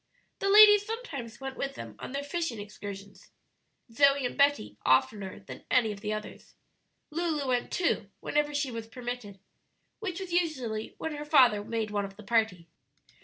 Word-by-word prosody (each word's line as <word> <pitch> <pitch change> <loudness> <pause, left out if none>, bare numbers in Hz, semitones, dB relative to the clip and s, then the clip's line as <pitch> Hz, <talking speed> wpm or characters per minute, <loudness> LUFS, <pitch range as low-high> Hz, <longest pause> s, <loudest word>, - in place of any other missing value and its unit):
The 395 - 0
ladies 415 0 +9
sometimes 295 - -6
went 270 0 -6
with 275 0 -3
them - - -8
on - - -7
their 280 +1 -3
fishing 290 -6 -3
excursions; 200 -1 -9 0.6
Zoe 275 +2 +4
and 245 - -3
Betty 280 - +2
oftener 190 +10 +1
than 190 - -10
any 230 -4 +3
of 200 -1 -8
the 210 0 -3
others. 215 0 -7 0.6
Lulu 310 -3 -1
went, 245 -1 0
too, 350 - 0
whenever 295 0 0
she 285 -3 -1
was 230 -1 -6
permitted, 240 -3 -6 0.6
which 380 -5 -4
was 375 -3 -6
usually 260 -11 -1
when 320 - -4
her 295 0 -5
father 255 -9 +5
made 220 -1 -3
one 205 -1 0
of 195 0 -10
the 215 - -12
party. 220 -6 0
250 Hz, 170 wpm, -29 LUFS, 215-295 Hz, 0.6 s, ladies